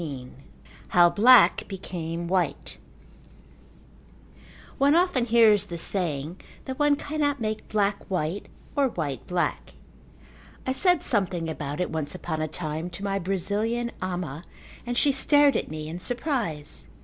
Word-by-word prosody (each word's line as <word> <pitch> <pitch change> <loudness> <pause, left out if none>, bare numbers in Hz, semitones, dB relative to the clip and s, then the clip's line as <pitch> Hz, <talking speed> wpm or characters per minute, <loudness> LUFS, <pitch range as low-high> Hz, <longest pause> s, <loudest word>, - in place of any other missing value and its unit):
XV 135 -6 -6 0.6
How 175 -1 +5
Black 240 +2 +6
Became 170 -3 -5
White 175 -5 -1 2.0
One 280 +3 +4
often 345 -8 +2
hears 220 -4 +5
the 170 - -5
saying 165 -2 -2 0.2
that 260 +1 -6
one 295 -1 +4
cannot 290 -1 -1
make 215 -1 -4
black 205 -1 0
white 180 +1 -2 0.3
or 280 -2 +3
white 150 - -4
black. 180 -1 -2 0.9
I 260 - 0
said 355 +4 +2
something 185 -6 0
about 150 -1 -5
it 180 - -1
once 155 0 -3
upon 160 -3 -4
a 155 - -1
time 155 +1 -4
to 180 +3 -9
my 195 -1 -1
Brazilian 205 +6 -1
ama 175 -5 -4 0.4
and 245 0 -2
she 285 - +4
stared 290 +1 +4
at - - -1
me 155 0 -6
in 165 +3 -6
surprise. 235 - -3
190 Hz, 135 wpm, -26 LUFS, 165-240 Hz, 2.0 s, Black